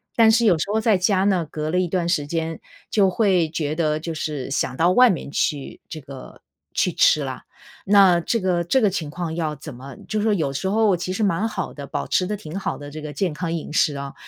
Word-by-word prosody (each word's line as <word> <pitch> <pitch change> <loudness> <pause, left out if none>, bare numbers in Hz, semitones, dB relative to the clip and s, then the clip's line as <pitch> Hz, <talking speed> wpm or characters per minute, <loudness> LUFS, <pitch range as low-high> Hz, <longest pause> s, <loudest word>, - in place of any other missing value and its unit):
但 225 -1 +6
是 235 +1 +3
有 175 - +4
时 155 - -1
候 220 - +2
在 220 -3 +3
家 190 +1 +2
呢， 185 -5 +2
隔 155 0 -4
了 180 +3 +1
一 185 - +1
段 175 0 -1
时 150 -4 +1
间 160 +1 -3 0.3
就 200 -3 +3
会 185 -5 +2
觉 155 -1 -2
得 155 -2 0
就 165 +1 -5
是 150 -4 -4
想 135 - -1
到 170 +2 +3
外 250 +5 +6
面 165 - -4
去 145 -1 -2
这 155 - -6
个 135 -1 -11 0.3
去 - - +1
吃 - - +4
了。 - - -6 0.4
那 195 -4 +5
这 230 - 0
个 180 -3 0
这 220 +10 +2
个 210 - +4
情 165 -6 -4
况 165 0 -4
要 160 -3 -2
怎 145 0 -9
么 130 +2 -10
就 215 -1 -1
说 215 -1 +2
有 155 -7 -1
时 140 +8 -2
候 210 -2 +3
其 180 +2 -4
实 215 +3 -1
蛮 200 +3 +1
好 190 -5 -4
的， 140 -1 -8
保 - - -4
持 180 - +1
得 210 +2 -3
挺 160 -2 -7
好 195 - -3
的 145 0 -9
这 155 +2 -8
个 150 -1 -6
健 175 +2 -1
康 165 +1 -4
饮 160 -2 -5
食 150 -3 +2
啊， 140 0 -6
170 Hz, 265 characters per minute, -22 LUFS, 155-195 Hz, 0.4 s, 但